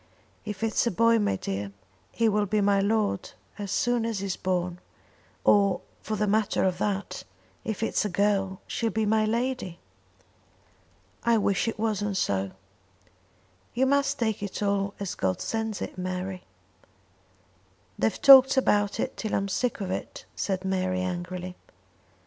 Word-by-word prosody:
If 210 0 -5
it's 225 +1 +1
a - - +4
boy, 230 +3 +3
my 205 - +1
dear, 100 +1 -4 0.4
he 230 - +1
will 210 -1 +2
be 210 +2 +1
my 200 -1 +3
lord 205 -1 0 0.3
as 200 -1 -4
soon 240 +1 +1
as 225 -2 -2
he's 195 -1 -2
born; 180 -1 -2 0.6
or 200 -2 +4 0.2
for 220 - -3
the 210 0 0
matter 210 +1 +1
of 185 -2 0
that, 200 -1 -2 0.4
if 220 0 -3
it's - - +1
a 210 - -1
girl 195 0 0
she 230 - -2
will 220 - -2
be 220 0 +1
my 215 +1 +3
lady." 235 -5 -2 1.5
"I 235 -1 +4
wish 200 0 +1
it 225 - -2
wasn't 210 -2 -1
so." 95 - 0 1.3
"You 260 +2 +3
must 280 +1 +2
take 220 -4 -1
it 205 +1 -4
all 200 0 0
as 200 -2 -3
God 95 -1 -1
sends 220 -2 -2
it, - - -7
Mary." 185 0 -4 1.5
"They've 110 - +1
talked 270 -1 +9
about 205 -6 +2
it - - -2
till 220 - -2
I'm 195 - 0
sick 240 +3 -1
of 185 -2 -3
it," - - -5
said 190 -1 -2
Mary 185 -1 0
angrily. 180 0 -4
200 Hz, 155 wpm, -27 LUFS, 185-220 Hz, 1.5 s, talked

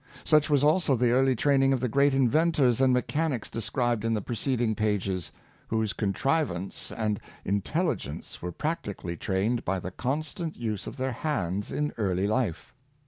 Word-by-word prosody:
Such 155 -1 +4
was 145 -2 +3
also 155 -1 +4
the 120 0 +2
early 130 +1 +3
training 135 +2 +3
of 130 - +1
the 125 - 0
great 140 +3 +3
inventors 135 -1 +3
and 130 -1 +5
mechanics 135 0 0
de 115 - -3
scribed 120 -1 0
in 115 0 +1
the 105 - -1
preceding 120 -1 0
pages, 100 -5 -1 0.4
whose 110 -1 0
contrivance 100 - -1
and 105 -2 -1 0.3
intelligence 100 - -2
were 90 - -4
practically 100 - -3
trained 100 +7 0
by 95 +1 0
the 90 +1 -6
constant 155 - -3
use 110 -4 -3
of - - -7
their 130 0 -1
hands 105 - -2
in 150 0 -1
early 95 -2 +1
life. 110 -5 -1
120 Hz, 160 wpm, -28 LUFS, 105-140 Hz, 0.4 s, and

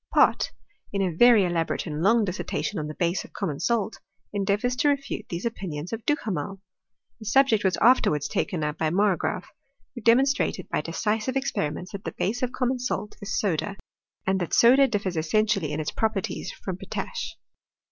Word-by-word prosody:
Pott, - - +4 0.4
in 200 -1 0
a 185 - 0
yery 230 -2 +6
elaborate 170 -2 -1
and 155 -1 -3
Iqng 225 +2 +4
dissertation 190 +1 -3
on 150 - -3
the 155 - -7
base 170 0 0
of - - -15
common 155 -8 -3
salt, 225 -3 0 0.3
endeavours 205 +5 0
to 290 - +3
refute 280 -1 -2
these 170 +4 -4
opinions 180 -7 -4
of 225 0 -4
Duhamel. 195 - -1 0.6
The 220 - -10
subject 225 0 +4
was 185 -3 +2
afterwards 150 - +4
taken 165 +2 -1
up 150 0 -3
by 160 - +2
Margraafy 185 0 +1 0.5
who 240 - -8
demonstrated, 260 +5 +3
by - - 0
decisive 220 +4 -1
expen 265 - -1
ments, 180 - -8
that 200 0 -7
the - - -5
base 230 +5 -1
of 250 -1 0
common 255 0 0
salt 210 -4 -3
is 200 0 -2
soda; 195 +1 -1 0.5
and 190 0 +1
that 175 - -1
soda 265 +4 +7
differs 200 -7 -2
essentially 195 0 +1
in 150 - -2
its 155 - -2
properties 205 -4 -2
from 185 -2 -6
potash. 485 - -5
200 Hz, 175 wpm, -26 LUFS, 175-235 Hz, 0.6 s, soda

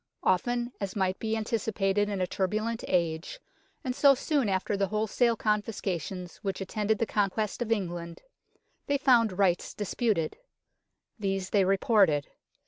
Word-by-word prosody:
Often, 240 +6 +1
as 195 -1 -3
might 190 -2 0
be 220 0 -1
anticipated 210 -2 0
in 200 -2 -2
a - - +2
turbulent 215 +5 -2
age, 170 - -1 0.4
and 255 -1 -2
so 280 0 +6
soon 275 -4 0
after 190 +2 0
the 195 0 +1
whole 215 +2 0
sale 235 +2 +2
confiscations 195 -5 -2
which 195 -2 -4
attended 210 +2 -1
the 230 - 0
conquest 210 +1 -1
of 230 -2 -2
England, 175 -5 -3 0.6
they 285 - +2
found 235 -8 +3
rights 185 -3 +1
disputed. 205 - -1 0.8
These 195 -2 -2
they 200 -2 +4
reported. 195 -6 +3
205 Hz, 140 wpm, -28 LUFS, 185-225 Hz, 0.8 s, so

